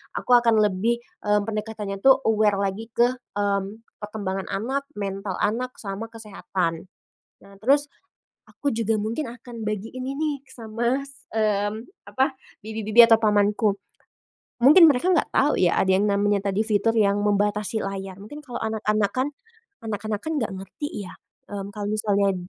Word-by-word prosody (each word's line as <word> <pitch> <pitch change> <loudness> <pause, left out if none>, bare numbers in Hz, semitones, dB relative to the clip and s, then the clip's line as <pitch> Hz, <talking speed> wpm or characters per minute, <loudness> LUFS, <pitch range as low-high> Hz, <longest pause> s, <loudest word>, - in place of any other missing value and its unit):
aku - - -5
akan 230 -2 +3
lebih, 210 +4 +1 0.3
mmm, 210 0 +3
pendekatannya 215 -2 -4
tuh 270 0 +6
aware 210 -2 +3
lagi 200 +3 -3
ke, 240 +1 +4 0.3
mmm, 200 +2 -1 0.2
perkembangan 200 -2 -4
anak, 270 +7 -2
mental 195 -1 -4
anak, 250 +4 -1
sama 200 +2 -5
kesehatan. 195 -6 -4 0.5
Nah 200 0 -16
terus, 285 +5 +2 0.6
aku 285 - -3
juga 225 -1 0
mungkin 230 +5 -3
akan 240 -2 -9
bagiin 220 +5 -4
ini 285 0 -2
sama 235 +3 -2
s 275 0 -17
mmm, 210 -1 +1 0.3
apa, 265 +1 +1 0.3
bibi-bibi 220 +1 +4
atau 225 -1 +6
pamanku. 210 -1 +2 0.9
Mungkin 330 +6 +9
mereka 275 +7 -1
nggak 330 - +1
tau 290 +2 +3
ya, 175 -2 +3
ada 190 - +3
yang 200 - +2
namanya 200 0 +1
tadi 205 +3 +1
fitur 220 +1 +2
yang 205 -1 +3
membatasi 210 +1 +1
layar, 195 -1 -5
mungkin 295 +9 -9
kalau 245 -4 -6
anak-anak 215 -2 0
kan 260 +2 +1 0.6
anak-anak 215 -1 -3
kan 320 0 -3
nggak 225 - -2
ngerti 205 - -6
ya, - - -10 0.4
mmm, 200 0 -5
kalau 205 -1 -4
misalnya 200 -2 +1
215 Hz, 150 wpm, -24 LUFS, 200-235 Hz, 0.9 s, Mungkin